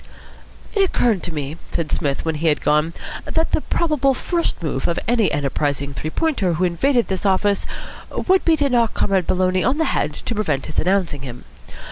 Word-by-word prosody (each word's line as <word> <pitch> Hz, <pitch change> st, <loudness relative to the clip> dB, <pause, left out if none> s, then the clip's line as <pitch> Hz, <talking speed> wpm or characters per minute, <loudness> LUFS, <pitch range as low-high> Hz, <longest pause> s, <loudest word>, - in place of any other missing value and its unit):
"It 405 Hz, -, +2 dB
occurred 240 Hz, -, +2 dB
to 175 Hz, -, -1 dB
me," 150 Hz, 0 st, -4 dB
said 165 Hz, -3 st, -2 dB
Psmith, 140 Hz, +1 st, -1 dB
when 160 Hz, -, 0 dB
he 155 Hz, +2 st, -1 dB
had 150 Hz, -, +2 dB
gone, 150 Hz, +2 st, +2 dB, 0.3 s
"that 320 Hz, 0 st, 0 dB
the -, -, +2 dB
probable 295 Hz, -6 st, +1 dB
first 340 Hz, -, -2 dB
move 135 Hz, -4 st, -1 dB
of 170 Hz, -, -1 dB
any 230 Hz, -2 st, +2 dB
enterprising 140 Hz, 0 st, -1 dB
Three 155 Hz, -, -4 dB
Pointer 215 Hz, -, 0 dB
who 170 Hz, +3 st, -1 dB
invaded 240 Hz, +8 st, +2 dB
this 190 Hz, -2 st, -2 dB
office 200 Hz, +1 st, +2 dB, 0.4 s
would 375 Hz, 0 st, +2 dB
be 330 Hz, -, +4 dB
to 290 Hz, -1 st, +2 dB
knock 235 Hz, -4 st, +2 dB
Comrade 190 Hz, -4 st, +1 dB
Maloney 185 Hz, 0 st, +2 dB
on 260 Hz, +5 st, +1 dB
the 320 Hz, -, +1 dB
head 150 Hz, -, -1 dB
to 235 Hz, -, -4 dB
prevent 160 Hz, -11 st, -1 dB
his -, -, -3 dB
announcing 180 Hz, -5 st, +1 dB
him. 125 Hz, -2 st, -8 dB
185 Hz, 190 wpm, -21 LUFS, 150-250 Hz, 0.4 s, be